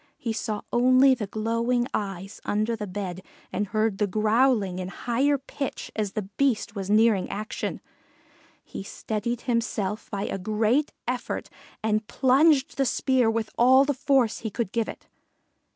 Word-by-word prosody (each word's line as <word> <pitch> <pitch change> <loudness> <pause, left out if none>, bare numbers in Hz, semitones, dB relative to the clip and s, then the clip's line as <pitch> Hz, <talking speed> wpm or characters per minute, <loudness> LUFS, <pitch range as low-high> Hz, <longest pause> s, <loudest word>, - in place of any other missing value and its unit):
He 230 - -3
saw 215 -2 -3
only 255 +2 +6
the 225 -5 -3
glowing 230 +4 0
eyes 195 0 -4
under 215 +3 0
the 210 -2 -5
bed 185 -1 -5 0.3
and 205 +2 -1
heard 215 0 0
the 210 - +2
growling 215 -1 +2
in 180 - -4
higher 260 +8 0
pitch 275 0 -6
as 210 -3 -2
the 215 - -2
Beast 225 +2 0
was 195 -1 -4
nearing 215 -2 +4
action. 215 +2 -4 0.8
He - - -8
steadied 220 +4 -3
himself 225 -4 -2
by 200 -1 -3
a 195 - -3
great 220 +8 +1 0.2
effort 250 0 -3 0.3
and 215 0 0
plunged 275 +2 +3
the 270 - +2
spear 255 -1 +2
with 225 -1 -2
all 260 +3 +6
the 285 - +1
force 265 -4 +2
he 220 - -4
could 210 -2 -3
give 230 -2 -1
it. - - -9
225 Hz, 155 wpm, -26 LUFS, 205-250 Hz, 0.8 s, only